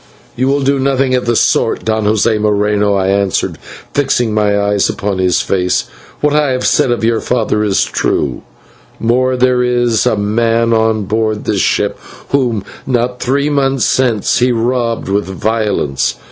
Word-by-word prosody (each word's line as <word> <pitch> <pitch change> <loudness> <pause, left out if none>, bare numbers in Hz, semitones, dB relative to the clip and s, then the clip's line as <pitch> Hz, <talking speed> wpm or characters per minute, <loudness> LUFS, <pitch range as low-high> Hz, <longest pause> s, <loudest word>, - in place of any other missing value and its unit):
"You 130 +2 0
will 140 +1 +1
do 140 +1 +1
nothing 135 -1 +1
of 125 -1 0
the 120 - +2
sort, - - +1
Don 110 -1 0
José 110 +1 +1
Moreno," 105 -1 +1
I 95 -1 0
answered, 100 -1 0 0.3
fixing 125 -5 0
my 105 -1 +1
eyes 100 -1 +1
upon 100 -2 -3
his 90 -2 +2
face; 90 -2 0 0.4
"what 150 0 +2
I 150 -3 +2
have 130 - -2
said - - +2
of 120 -1 -1
your 115 0 +1
father 110 -3 0
is 100 -2 +1
true; - - -1 0.6
more, 125 +3 +1
there 125 0 +2
is 120 -2 +1
a 110 - +1
man 115 +3 +1
on 110 -1 +1
board 110 +1 -2
this - - 0
ship - - 0 0.3
whom, 120 -7 0 0.2
not 125 -1 -1
three 140 +3 0
months 135 -3 +1
since, 120 -6 +1
he 125 +1 +2
robbed 120 0 -1
with 100 +1 0
violence. 100 - -1
115 Hz, 165 wpm, -14 LUFS, 105-125 Hz, 0.6 s, the